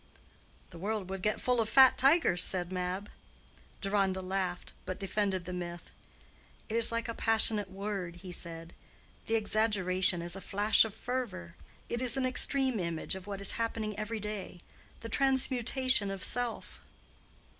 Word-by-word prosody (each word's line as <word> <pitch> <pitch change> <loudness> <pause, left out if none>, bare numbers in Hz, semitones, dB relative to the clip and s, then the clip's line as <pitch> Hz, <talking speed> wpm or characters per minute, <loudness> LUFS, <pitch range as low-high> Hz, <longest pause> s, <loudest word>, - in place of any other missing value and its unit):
"The 170 - -11
world 200 0 -3
would 195 -1 -5
get 210 +3 0
full 250 -2 +1
of 220 - -2
fat 265 +2 +7
tigers," 270 - +3
said 180 -1 0
Mab. 185 +2 -3 0.7
Deronda 195 -2 0
laughed, 185 -1 -3
but 185 - -6
defended 195 -2 -2
the 180 - -6
myth. 175 -1 -7 0.8
"It 220 - -3
is 230 0 +5
like 230 0 -2
a 230 - -3
passionate 220 -3 +2
word," 195 -3 -5
he 180 +1 -10
said; 165 -1 -6 0.5
"the 225 - +1
exaggeration 190 -5 +2
is 175 +1 -2
a 195 - -8
flash 205 +4 +3
of 220 -2 -7
fervor. 205 -11 -5 0.3
It 235 - -3
is 255 +1 +3
an 265 - 0
extreme 260 -1 +2
image 170 -3 -3
of 190 0 -8
what 200 -1 -6
is 200 - +6
happening 220 -2 -2
every 215 +2 -4
day—the 210 +1 -9
transmutation 260 -3 +2
of 195 -1 -5
self." 245 -1 -2
205 Hz, 155 wpm, -31 LUFS, 185-230 Hz, 0.8 s, fat